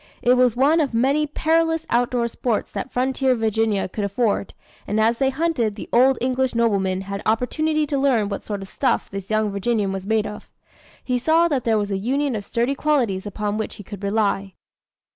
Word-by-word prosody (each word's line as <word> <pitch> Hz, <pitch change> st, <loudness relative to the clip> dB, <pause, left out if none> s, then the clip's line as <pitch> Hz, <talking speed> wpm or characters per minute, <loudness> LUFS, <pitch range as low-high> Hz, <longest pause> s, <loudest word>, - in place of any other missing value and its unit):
It 245 Hz, -, +5 dB
was 250 Hz, -2 st, +3 dB
one 285 Hz, +6 st, +3 dB
of 275 Hz, -6 st, -1 dB
many 275 Hz, +6 st, +2 dB
perilous 325 Hz, +2 st, +1 dB
outdoor 240 Hz, 0 st, +1 dB
sports 235 Hz, -1 st, -2 dB
that 200 Hz, +5 st, -5 dB
frontier 260 Hz, +1 st, +1 dB
Virginia 220 Hz, -2 st, 0 dB
could 205 Hz, +3 st, -4 dB
afford; 200 Hz, 0 st, -1 dB, 0.3 s
and 210 Hz, -, 0 dB
as 230 Hz, +2 st, +2 dB
they 270 Hz, -1 st, +3 dB
hunted, 270 Hz, -7 st, 0 dB
the 205 Hz, -, -8 dB
old 255 Hz, +2 st, +5 dB
English 255 Hz, 0 st, 0 dB
nobleman 195 Hz, -5 st, +1 dB
had 200 Hz, +1 st, -5 dB
opportunity 305 Hz, +7 st, 0 dB
to 280 Hz, -1 st, -1 dB
learn 255 Hz, -7 st, +2 dB
what 200 Hz, -1 st, -4 dB
sort 205 Hz, -2 st, -5 dB
of -, -, -10 dB
stuff -, -, -1 dB
this 195 Hz, -1 st, -6 dB
young 215 Hz, -1 st, +1 dB
Virginian 200 Hz, 0 st, 0 dB
was 195 Hz, 0 st, -5 dB
made 220 Hz, -1 st, +1 dB
of. 210 Hz, -, -8 dB, 0.5 s
He 250 Hz, -1 st, 0 dB
saw 325 Hz, +6 st, +3 dB
that 270 Hz, -6 st, -1 dB
here 225 Hz, -2 st, +3 dB
was 205 Hz, -1 st, -2 dB
a 195 Hz, -, -1 dB
union 270 Hz, +4 st, 0 dB
of 205 Hz, -, -4 dB
sturdy 235 Hz, +6 st, 0 dB
qualities 250 Hz, -10 st, 0 dB
upon 210 Hz, +1 st, -3 dB
which 220 Hz, -, -4 dB
he 205 Hz, -, -10 dB
could 205 Hz, 0 st, -9 dB
rely. 200 Hz, -2 st, 0 dB
230 Hz, 200 wpm, -22 LUFS, 205-265 Hz, 0.5 s, It